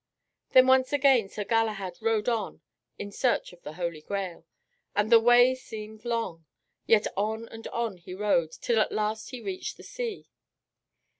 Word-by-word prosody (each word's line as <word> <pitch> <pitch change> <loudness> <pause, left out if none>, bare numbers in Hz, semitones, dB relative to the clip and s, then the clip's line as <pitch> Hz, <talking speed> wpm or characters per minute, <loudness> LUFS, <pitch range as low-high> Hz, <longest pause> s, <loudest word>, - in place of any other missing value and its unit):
Then 255 -1 +8
once 260 0 +4
again 270 -7 +4
Sir 210 - -4
Galahad 210 -5 -1
rode 225 -1 +1
on 225 -4 -2 0.4
in 205 0 -6
search 240 -3 0
of 175 - -18
the 150 - -8
Holy 170 -2 -4
Grail. 185 -2 -5 0.5
And 210 +2 +1
the 230 - +9
way 245 +2 +6
seemed 220 -3 -9
long, 225 -9 -3 0.4
yet 220 -2 +4
on 220 +3 -2
and 225 0 -9
on 230 -5 -3
he 180 +1 -9
rode, 185 -5 +1
till 230 +6 0
at - - +1
last 215 +1 -2
he 250 - -7
reached 370 +3 -5
the - - -13
sea. 485 -4 -5
220 Hz, 165 wpm, -27 LUFS, 195-240 Hz, 0.5 s, the